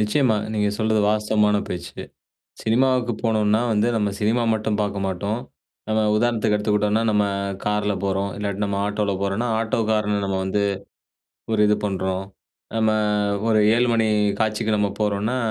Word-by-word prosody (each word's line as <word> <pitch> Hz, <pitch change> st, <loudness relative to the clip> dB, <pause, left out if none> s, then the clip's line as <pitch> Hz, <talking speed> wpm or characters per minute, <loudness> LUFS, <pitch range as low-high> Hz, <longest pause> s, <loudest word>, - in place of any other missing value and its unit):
நிச்சயமா. 110 Hz, +2 st, +2 dB, 0.2 s
நீங்க 105 Hz, -1 st, +1 dB
சொல்றது 110 Hz, -1 st, +2 dB
வாஸ்தவமான 105 Hz, 0 st, +2 dB
பேச்சு. 90 Hz, -1 st, -6 dB, 0.6 s
சினிமாவுக்கு 125 Hz, +1 st, +2 dB
போனோன்னா 110 Hz, -1 st, +2 dB
வந்து 105 Hz, +2 st, +2 dB
நம்ம 105 Hz, -2 st, 0 dB
சினிமா 110 Hz, +3 st, +1 dB
மட்டும் 110 Hz, -1 st, -1 dB
பார்க்க 100 Hz, -1 st, -2 dB
மாட்டோம். 100 Hz, +5 st, -2 dB, 0.5 s
நம்ம 110 Hz, 0 st, +1 dB, 0.2 s
உதாரணத்துக்கு 110 Hz, -2 st, +1 dB
எடுத்துக்கிட்டோன்னா, 105 Hz, +1 st, +1 dB
நம்ம 105 Hz, -1 st, +2 dB, 0.4 s
கார்ல 105 Hz, 0 st, 0 dB
போறோம். 100 Hz, +1 st, -1 dB
இல்லாட்டி 100 Hz, 0 st, -3 dB
நம்ம 100 Hz, -1 st, -2 dB
ஆட்டோல 105 Hz, -1 st, -1 dB
போறோன்னா, 100 Hz, +4 st, -1 dB
ஆட்டோக்காரன 110 Hz, -2 st, 0 dB
நம்ம 95 Hz, -1 st, -1 dB
வந்து, 100 Hz, +2 st, 0 dB, 0.9 s
ஒரு 110 Hz, -, +2 dB
இது 105 Hz, -, +3 dB
பண்றோம். 95 Hz, -1 st, -2 dB, 0.5 s
நம்ம 110 Hz, -1 st, +2 dB, 0.6 s
ஒரு 110 Hz, -1 st, +4 dB, 0.2 s
7 120 Hz, +1 st, +2 dB
மணி 115 Hz, -1 st, +2 dB, 0.3 s
காட்சிக்கு 110 Hz, 0 st, 0 dB
நம்ம 105 Hz, -1 st, +1 dB
போறோன்னா, 105 Hz, +3 st, 0 dB
105 Hz, 140 wpm, -22 LUFS, 105-110 Hz, 0.9 s, ஒரு